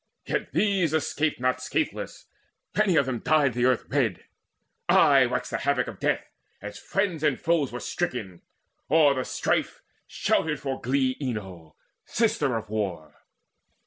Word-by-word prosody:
Yet - - -2
these 190 -7 +2
escaped 155 -1 0
not 130 0 0
scatheless; 130 - -3 0.5
many 210 -4 +3
of 140 - +4
them 125 -3 -2
Dyed 145 -3 +2
the 120 +1 +1
earth 130 -2 +2
red: 125 -10 0 0.7
aye - - +6
waxed - - -3
the - - -1
havoc - - +1
of - - -8
death - - 0 0.3
As 105 +1 -8
friends 195 -6 -1
and 150 -5 +1
foes 165 -5 +1
were 125 - -5
stricken. 120 - -4 0.5
O'er 155 -3 +5
the 130 -1 -2
strife - - -1 0.2
Shouted 150 -2 0
for 135 -2 -4
glee 130 0 +1
Enyo, 95 - -5 0.3
sister 210 - +1
of 110 -1 -7
War. 95 -8 -3
130 Hz, 145 wpm, -26 LUFS, 115-155 Hz, 0.7 s, aye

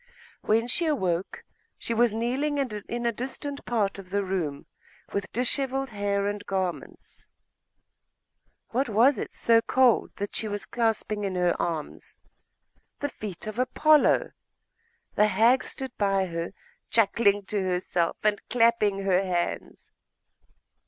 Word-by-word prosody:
When 225 +2 +2
she 335 +7 +1
awoke, 185 - -1 0.3
she 235 - -3
was 235 0 +3
kneeling 255 +7 -1
in 240 -2 -3
a 235 - +3
distant 270 +4 -5
part 205 -5 0
of 185 -2 -11
the 200 +1 0
room, 170 -7 -3 0.5
with 200 -1 -3
dishevelled 265 +1 -1
hair 200 -1 -1
and 205 0 -3
garments. 190 -3 -4 1.4
What 255 +2 0
was 230 +3 +4
it - - -4
so 230 -1 +3
cold 255 -1 +3
that 205 0 -5
she 220 - -1
was 205 -1 -3
clasping 220 -2 -1
in 195 -2 -2
her 180 -1 +2
arms? 165 -3 -5 0.8
The 285 - -2
feet 205 -8 -7
of 215 0 -6
the - - +2
Apollo! 305 +3 +3 0.8
The 210 - +4
hag 225 +6 +4
stood 265 -2 -6
by 195 -2 +2
her, 170 -1 -4 0.4
chuckling 205 -2 +3
to 205 0 -1
herself 180 -2 -1
and 210 -1 +2
clapping 230 -4 +2
her 190 -1 +3
hands. 175 -2 -3
210 Hz, 135 wpm, -26 LUFS, 195-240 Hz, 1.4 s, was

